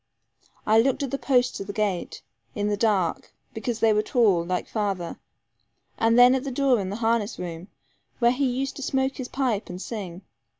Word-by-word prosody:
I 220 +1 +5
looked 270 +3 0
at 270 - -3
the 275 - -2
posts 250 -2 +1
of 195 - -6
the 200 - -5
gate, 200 -4 -2 0.3
in 205 0 -1
the 205 - +1
dark, 200 -6 0 0.2
because 225 0 -4
they 225 -1 +5
were 210 - +2
tall, 215 -8 +2
like 180 +1 -2
father, 195 -5 -3 0.8
and 230 +1 +2
then 245 +1 +8
at 265 -1 0
the 275 - -3
door 265 -2 +2
of 190 -2 -3
the 200 - -4
harness 225 -1 0
room, 170 0 -6 0.5
where 240 -1 +4
he 270 +2 0
used 265 +2 -2
to - - -7
smoke 265 0 -1
his 255 - -5
pipe 250 -7 -1
and 180 0 -6
sing. 190 -4 -6
225 Hz, 200 wpm, -25 LUFS, 200-255 Hz, 0.8 s, then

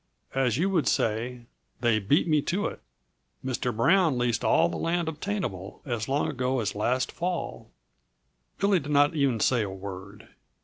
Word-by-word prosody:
As 130 -4 +1
you 175 +5 +2
would 170 -6 +1
say, 120 +3 0 0.4
they 115 -3 +3
beat 125 - +2
me 155 -2 +3
to 190 +8 -1
it. - - -4 0.6
Mr. 125 -1 -1
Brown 165 +2 +4
leased 120 -2 0
all 165 - +4
the - - -5
land 170 0 -1
obtainable, 155 - -4
as 120 -3 -3
long 140 +2 +1
ago 130 -2 -1
as 105 -4 -1
last 125 +5 0
fall." 175 0 -4 0.9
Billy 200 -2 +3
did 145 0 -6
not 145 +1 +4
even 140 -7 +1
say 120 +2 +3
a 105 - -2
word. 95 +1 -9
130 Hz, 165 wpm, -27 LUFS, 115-160 Hz, 0.9 s, Brown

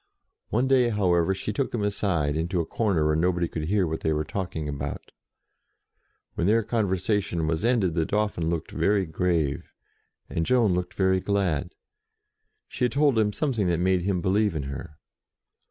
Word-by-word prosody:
One 120 +4 +1
day, 130 -2 +4
however, 95 -4 +2
she 100 +2 -4
took 130 +2 -2
him 105 - -1
aside, 90 -8 0
into 85 +3 -1
a 85 - 0
corner 95 -5 0
where 75 0 +2
nobody 85 +1 +1
could 80 -1 -4
hear 100 +2 +2
what 80 -1 -3
they 80 - 0
were 75 0 0
talking 80 -1 -4
about. 70 -1 -5 1.2
When 85 - -1
their 115 +2 +3
con 110 -1 0
versation 95 -3 -1
was 80 0 -1
ended, 115 -8 +2
the 80 -1 +1
Dauphin 105 -6 0
looked 85 -2 -3
very 100 -2 +1
grave, 80 -3 -1 0.6
and 80 - -2
Jeanne 115 -1 +3
looked 90 0 -3
very 95 -1 +2
glad. 95 -6 -1 0.9
She - - -1
had 125 - -1
told 140 -4 +3
him 105 -1 +2
something 115 - -1
that 85 -1 +1
made 90 0 +2
him 90 -1 -1
believe 100 +1 +1
in 75 - -2
her. 70 +2 -7
95 Hz, 175 wpm, -26 LUFS, 80-105 Hz, 1.2 s, day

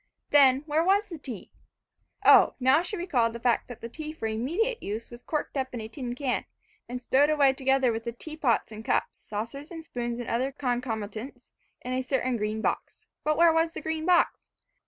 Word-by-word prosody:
Then, 270 -2 +6
where 310 +1 +1
was 400 +3 +2
the 335 -4 -7
tea? 250 -8 -8 0.7
O, - - +7
now 260 +4 +5
she 360 +4 -4
recalled 255 -11 +1
the 235 - -6
fact 240 0 +1
that 245 - -10
the 230 - -5
tea 305 +5 -7
for 315 - -6
immediate 325 - -1
use 215 +4 -5
was 240 0 -10
corked 305 +2 -3
up 260 -2 -2
in - - -4
a 220 - -5
tin 245 0 -5
can 255 -1 -1 0.5
and 250 +1 -4
stowed 280 +4 +4
away 285 -3 +4
together 265 -1 +2
with 225 +1 -4
the 235 - -2
teapot 270 -2 -1
and 215 0 -8
cups, - - 0
saucers, 230 +8 -6 0.2
spoons 240 -4 -3
and 240 - -5
other 255 +4 0
concomitants, 245 -2 -4 0.3
in 250 - -4
a 255 - 0
certain 255 -1 0
green 215 0 -2
box. - - -3 0.2
But 305 0 +1
where 335 -1 +6
was 325 0 +2
the - - -6
green 320 +1 -3
box? 355 -1 +4
260 Hz, 200 wpm, -27 LUFS, 235-305 Hz, 0.7 s, O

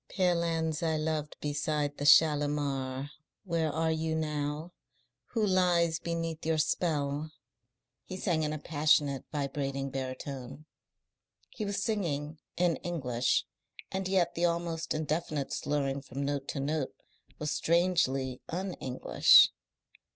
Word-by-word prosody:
"Pale 180 -3 +2
hands 160 -2 -1
I 160 -2 +1
loved 155 -1 -2
beside 145 0 -1
the 145 - -1
Shalimar. 145 -3 +3 0.3
Where 165 -5 0
are 160 +1 0
you 160 0 -1
now? 150 +1 -2 0.6
Who 220 -2 +3
lies 175 -4 +3
beneath 165 -1 -3
your 160 0 +1
spell?" 150 -2 0 0.7
he 185 - -6
sang 170 -4 0
in 150 -1 0
a 155 - -2
passionate, 145 -2 +2
vibrating 140 -2 -2
baritone. 135 +1 -6 0.9
He 215 - -4
was 200 0 -2
singing 155 -8 -2 0.2
in 175 -2 +2
English, 125 -8 0 0.5
and 190 0 -2
yet 185 -3 +2
the 170 - +1
almost 170 -2 -1
indefinite 155 -2 -2
slurring 140 -2 -1
from 135 +1 -5
note 140 -1 -2
to - - -3
note 150 +3 -2 0.4
was 150 0 -2
strangely 145 -7 +1
un 185 +2 -3
English. 130 -1 +6
155 Hz, 125 wpm, -30 LUFS, 145-170 Hz, 0.9 s, English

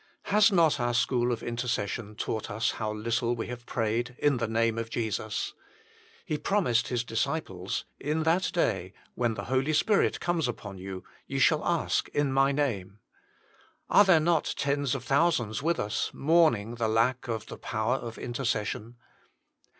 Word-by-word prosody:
Has 210 +1 +6
not 165 -6 +4
our 120 0 0
school 120 +1 +2
of 120 - -3
intercession 115 -3 -3
taught 110 +1 -3
us 110 +2 0
how 110 -1 -3
little 115 +2 -1
\ve 115 - -4
have 120 -1 -8
prayed 120 +1 -1
in 145 -3 +2
the 115 -1 -1
name 115 0 +1
of 115 0 -4
Jesus? 110 -2 -2 0.7
He 155 -5 -2
promised 185 - +1
His 120 -2 -1
disciples: 115 - -2
In 155 +2 -1
that 170 +4 +2
day, 95 - 0 0.2
when 120 -2 0
the 100 - -5
Holy 130 +6 0
Spirit 205 +6 +2
comes 170 -5 0
upon 100 -5 -6
you, 95 0 -7 0.2
ye - - -3
shall - - +4
ask - - 0
in 145 -2 +1
My 135 +1 +4
name. 105 -9 -2 0.9
Are 205 - +8
there 190 -5 +5
not 160 0 +1
tens 140 -1 0
of 130 - -5
thousands 135 -7 +1
with 165 +3 0
us 105 0 -1
mourning 140 -8 +3
the 115 -1 -1
lack 120 +4 +1
of 110 -2 -3
the - - -9
power 110 +4 -1
of 115 -3 -7
intercession 120 -2 -3
120 Hz, 165 wpm, -28 LUFS, 110-145 Hz, 0.9 s, Are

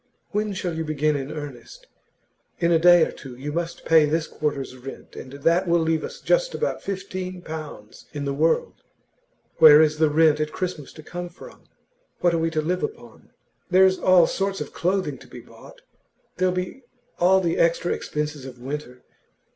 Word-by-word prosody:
'When 210 0 -1
shall 180 -2 -3
you 160 0 -3
begin 155 -1 0
in 140 +1 -4
earnest? 150 - -9 0.7
In 170 0 +1
a 165 - +4
day 175 0 +7
or - - -6
two 130 -3 -11
you 140 +4 -6
must 170 +1 -4
pay 160 -2 +5
this 155 +2 0
quarter's 140 -5 -4
rent, 130 +1 -11
and 130 - -9
that 165 +6 +1
will 170 0 +3
leave 160 -1 0
us - - -7
just - - +1
about 485 - -2
fifteen 185 -2 -5
pounds 155 -10 -9
in 145 -1 -5
the 140 - -1
world. 160 - 0 0.8
Where 150 -2 +9
is 155 -1 +3
the 155 -1 +4
rent 155 0 +4
at 155 0 -1
Christmas 175 -7 -5
to 155 - -12
come 175 +2 -6
from? 175 - -15 0.5
What 175 -1 +2
are 165 - +1
we 165 0 0
to 155 -1 -1
live 180 +3 -1
upon? 440 +2 -7 0.4
There's 190 +1 +4
all 185 -2 +5
sorts 195 +2 -2
of 150 - -6
clothing 180 -7 -1
to - - -15
be - - -11
bought; - - -16 0.6
there'll 185 0 +2
be 180 +8 -4 0.4
all 185 +2 +5
the 170 -3 -1
extra 170 +1 +2
expenses 150 -2 -4
of 130 -1 -9
winter. 130 -1 -7
165 Hz, 185 wpm, -23 LUFS, 150-180 Hz, 0.8 s, Where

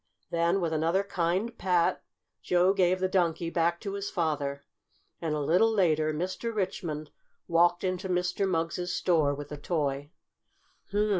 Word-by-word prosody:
Then, 170 +3 +2
with 165 -2 -1
another 165 +5 +1
kind 190 +5 -1
pat, 175 -2 +2 0.4
Joe 180 +2 +3
gave 185 -1 +2
the 185 - +1
Donkey 170 -3 0
back 170 0 +1
to 200 -3 -4
his 200 0 -3
father, 145 -5 -2 0.6
and, 160 -2 -1
a - - -1
little 175 +10 +3
later, 155 -7 +2
Mr. 185 +8 -3
Richmond 170 -7 -3 0.4
walked 175 +1 +3
into 185 0 -2
Mr. 180 +2 0
Mugg's 175 +1 -1
store 155 -7 +2
with 145 0 -8
the 150 - -6
toy. 145 -2 -2
175 Hz, 145 wpm, -28 LUFS, 155-185 Hz, 0.6 s, Joe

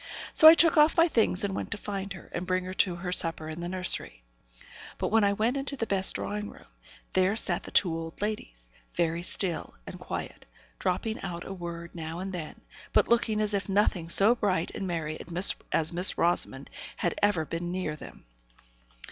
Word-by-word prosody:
So 315 - +8
I 320 - +11
took 335 -1 +4
off 300 +3 +5
my 335 +1 +6
things 220 - +2
and 200 -1 -1
went - - -4
to - - -3
find 200 -2 -5
her, 185 - -13
and 175 +1 -4
bring 185 0 0
her 185 +1 -6
to 185 -1 +1
her 180 +1 -5
supper 165 -3 +2
in 160 +1 -7
the 175 0 -4
nursery. 180 - -3 0.7
But - - -2
when 225 0 +3
I 200 0 +3
went 225 +6 0
into 275 +1 -4
the 230 - -2
best 195 -3 +2
drawing 210 0 -4
room, - - -15 0.5
there 185 +2 +2
sat 180 -5 +2
the - - -10
two 175 -4 +2
old 165 0 -7
ladies, - - -5 0.3
very 170 0 0
still 175 0 -1
and - - -9
quiet, - - -7 0.3
dropping 205 +4 -2
out 175 -2 -6
a 195 - -6
word 170 -2 -8
now 160 -1 -6
and 190 +1 -5
then, 165 -4 -7 0.3
but - - +3
looking 230 -2 +2
as 210 -1 0
if 200 0 -2
nothing 190 -4 +1
so 200 +6 +6
bright 195 -8 -1
and 195 - -5
merry 160 -3 -4 0.5
as 160 +1 +3
Miss 180 +3 +5
Rosamond 140 -5 0 0.3
had 175 - -1
ever 205 -6 +2
been 170 +2 -4
near 180 -4 -3
them. - - -13
185 Hz, 200 wpm, -28 LUFS, 170-205 Hz, 0.7 s, I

